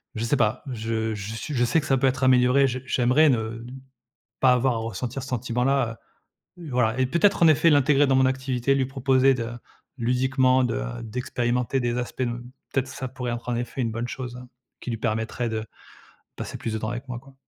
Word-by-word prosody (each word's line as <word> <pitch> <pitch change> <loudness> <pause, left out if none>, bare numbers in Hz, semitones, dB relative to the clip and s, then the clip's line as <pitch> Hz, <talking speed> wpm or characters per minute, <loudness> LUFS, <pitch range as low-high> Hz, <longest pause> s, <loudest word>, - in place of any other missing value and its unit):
je 110 - -3
sais 125 - +2
pas. 110 +4 +1
Je 110 -1 -2
je 105 +1 -6
sui 150 +6 -5
je 120 -3 +2
sais 120 +7 +3
que 140 - -5
ça 135 - +3
peut 135 - +2
être 130 0 -1
amélioré, 130 +1 +5
j'ai 130 0 -4
j'aimerais 130 +5 +3
ne 115 -2 -1 0.8
pas 130 - +6
avoir 125 +1 +2
à - - -2
ressentir 120 +3 -4
ce 130 - -8
sentiment-là, 125 0 0 0.6
heu, 165 -3 -8
voilà 125 -1 +1
et 130 - +2
peut-être 170 +8 +2
en - - +8
effet 155 +1 +5
l'intégrer 145 0 +4
dans 135 -1 +2
mon 130 0 +4
activité, 130 0 0
lui 135 -1 +1
proposer 135 0 +3
de 115 -3 -3 0.5
ludiquement 130 +1 +2
de, 125 - 0
heu, - - -4
d'expérimenter 125 +2 -1
des 120 -1 -1
aspects 125 +1 -4
ne 120 -1 -1 0.3
peut-être 135 -1 0
ça 130 0 -6
pourrait 125 -1 -5
être 120 +1 -6
en 120 - 0
effet 120 +2 -3
une 115 -2 -1
bonne 115 +2 -3
chose, 125 -1 -6
hein, 125 - -11 0.3
qui 125 - -5
lui 115 - -3
permettrait 110 +2 -2
de 110 -1 -3 0.7
passer - - -6
plus 115 - -4
de - - -1
temps 110 - -4
avec 120 +3 -5
moi, 125 -1 -4
quoi. 135 +1 -18
125 Hz, 215 wpm, -25 LUFS, 115-130 Hz, 0.8 s, en